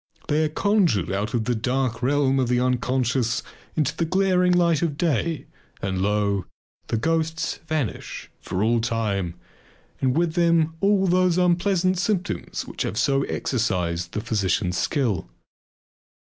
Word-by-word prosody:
They 155 +1 +2
are 155 - +1
conjured 175 - +2
out 105 +4 -2
of 110 -2 0
the 125 - +1
dark 125 0 -1
realm 135 +1 +2
of 130 - +1
the 125 0 +2
unconscious 125 -1 0 0.3
into 150 -1 0
the 165 - 0
glaring 180 +1 +2
light 170 -3 +3
of 155 -4 -1
day 160 -2 0 0.3
and, 95 -1 -2
lo! 100 -1 +1 0.4
the 115 - -1
ghosts 165 +4 -1
vanish 150 - -3
for 95 +2 -2
all 115 +1 +2
time 105 -6 -1 0.6
and 130 +2 +1
with 170 -1 +1
them 165 -2 +3
all 200 -1 +3
those 180 -1 +3
unpleasant 180 +1 +2
symptoms 195 -2 -2
which - - -7
have - - -2
so 135 +2 +2
exercised 90 -8 -1
the 105 - -2
physician's 105 -4 0
skill. 115 - 0
135 Hz, 145 wpm, -24 LUFS, 110-170 Hz, 0.6 s, light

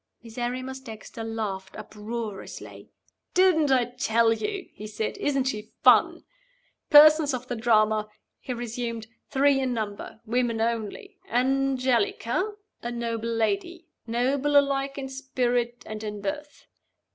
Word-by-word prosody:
Miserrimus 250 +3 -4
Dexter 225 -2 -9
laughed 210 -4 -4
uproariously. 215 0 -7 0.5
"Didn't 355 -5 +4
I 255 -2 +4
tell 230 -2 +2
you?" 395 - -4
he 215 - -8
said. 215 +1 -3
"Isn't 275 -2 +1
she 220 -4 -4
fun? - - +5 0.7
Persons 300 -2 +7
of 250 0 -7
the 245 - -3
Drama." 215 -2 +2 0.3
he - - -7
resumed: 235 -1 -4 0.2
"three 275 0 +3
in 255 -2 -1
number. 215 -1 -5
Women 235 0 0
only. 230 - -3
Angelica, 260 - +1 0.3
a 240 - -4
noble 230 -1 -3
lady; 345 - -1 0.2
noble 265 +5 +2
alike 275 0 +1
in 270 -1 -4
spirit 245 -3 -1
and 215 0 -6
in 210 -1 -5
birth. 295 +6 -5
245 Hz, 125 wpm, -26 LUFS, 225-275 Hz, 0.7 s, Persons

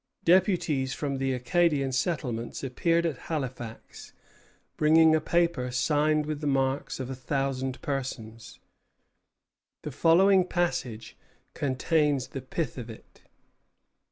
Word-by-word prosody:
Deputies 170 -7 +2
from 140 -2 -3
the 135 0 0
Acadian 140 +1 +1
settlements 130 -5 -2
appeared 165 +6 +1
at 155 -6 -2
Halifax, 130 -7 -6 0.6
bringing 160 +1 +5
a 155 - +1
paper 170 -7 +1
signed 150 +4 +1
with 150 0 -4
the 150 - -2
marks 135 0 0
of 130 0 -5
a - - -4
thousand 135 0 -2
persons. 115 -5 -5 1.3
The 150 - -5
following 180 +6 +4
passage 130 -12 -2 0.4
contains 140 -1 0
the 135 - -6
pith 130 +1 -4
of 120 -1 -8
it. 110 - -14
140 Hz, 115 wpm, -27 LUFS, 130-165 Hz, 1.3 s, bringing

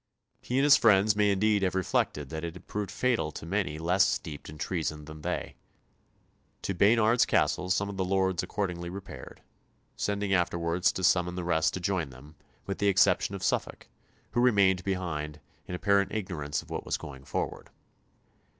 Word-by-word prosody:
He 125 - -2
and 135 - +3
his 145 -1 +7
friends 105 -1 +4
may 105 0 +3
indeed 100 +1 +2
have 95 -1 0
reflected 75 -6 0
that 80 0 -5
it 85 0 -5
had 90 - -12
proved 105 -1 -4
fatal 115 -12 0
to - - -8
many 90 -4 -1
less 90 +5 +3
steeped 75 -4 -4
in 75 - -10
treason 80 -2 -3
than 80 0 -10
they. - - -4 1.1
To 100 - -1
Baynard's 110 +5 +4
Castle 90 0 +1
some 100 +2 +1
of 100 -1 -6
the 95 - 0
lords 95 0 +1
accordingly 90 -2 -3
repaired, 95 +2 -9 0.5
sending 100 -1 -1
afterwards 85 -1 +1
to 95 - -4
summon 90 0 +3
the 90 - -3
rest 80 -2 +1
to - - -3
join 90 -4 -1
them, 65 +4 -14 0.3
with 100 - -4
the 100 - +2
exception 100 0 +3
of 95 - -7
Suffolk, - - -2 0.4
who 120 - +1
remained 100 -6 +4
behind, 80 -6 -3 0.3
in 90 - -4
apparent 100 +1 +2
ignorance 85 -9 -3
of - - -17
what - - -3
was - - -2
going 65 -2 -10
forward. - - -4
95 Hz, 180 wpm, -29 LUFS, 85-100 Hz, 1.1 s, his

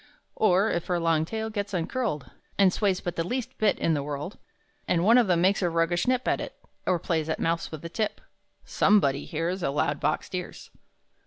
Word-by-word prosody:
Or, 200 +1 +3
if 170 - -2
her 180 -1 +1
long 165 -2 +2
tail 220 +4 -4
gets 205 -2 -3
uncurled 175 - -2 0.3
And 195 -2 +5
sways 195 -3 +1
but 175 -1 -4
the 165 - +1
least 245 +7 -3
bit 215 -2 +3
in 165 - +1
the 145 - 0
world, 145 +6 -5 0.5
And 170 -1 +2
one 230 +4 +7
of 235 - +3
them 175 -2 +3
makes 195 +3 +3
a 175 - +2
roguish 165 +3 +1
nip 255 0 +1
At - - +1
it, - - -7 0.3
or 185 - +3
plays 160 -1 -1
at 160 - -1
mouse 165 0 0
with 155 -1 -7
the - - -4
tip, 215 +4 -2 0.5
Somebody 140 -9 +3
hears, 170 +4 -2
A - - 0
loud 145 +1 0
boxed - - -1
ears! - - -6
175 Hz, 210 wpm, -27 LUFS, 165-205 Hz, 0.5 s, one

